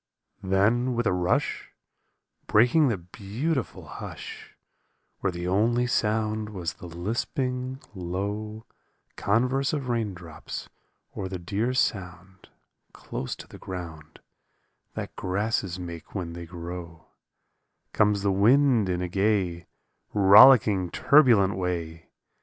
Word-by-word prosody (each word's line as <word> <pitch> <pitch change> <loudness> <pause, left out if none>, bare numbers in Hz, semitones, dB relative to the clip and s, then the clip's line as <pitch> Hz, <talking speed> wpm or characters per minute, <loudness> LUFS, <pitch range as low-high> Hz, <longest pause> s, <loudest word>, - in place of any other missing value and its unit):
Then 110 +7 +2
with 120 0 0
a - - +2
rush, 90 -1 0 0.8
Breaking 125 +8 +4
the 115 -5 0
beautiful 110 - -4
hush - - -9 0.6
Where 95 - 0
the 85 0 -5
only 115 +6 +2
sound 110 -2 0
was 90 -6 -4
the 90 - -11
lisping, 125 - -3
low 100 +4 -4 0.5
Converse 125 +7 +1
of 140 -4 -3
raindrops, 95 -9 -4 0.4
or 95 - -5
the 95 - -4
dear 105 +8 -2
sound 95 -5 -3 0.4
Close 65 - -5
to - - -12
the - - -13
ground, 80 -4 -8 0.7
That - - -6
grasses 95 -1 -1
make 85 0 -8
when 85 -4 -4
they 85 0 -8
grow, 85 -1 -8 0.9
Comes 105 -1 +2
the 100 - +2
wind 115 +2 +4
in 90 0 -1
a - - -2
gay, 95 -2 0 0.5
Rollicking, 100 -2 +7
turbulent 115 - +4
way. 85 -3 -4
100 Hz, 110 wpm, -26 LUFS, 90-115 Hz, 0.9 s, Rollicking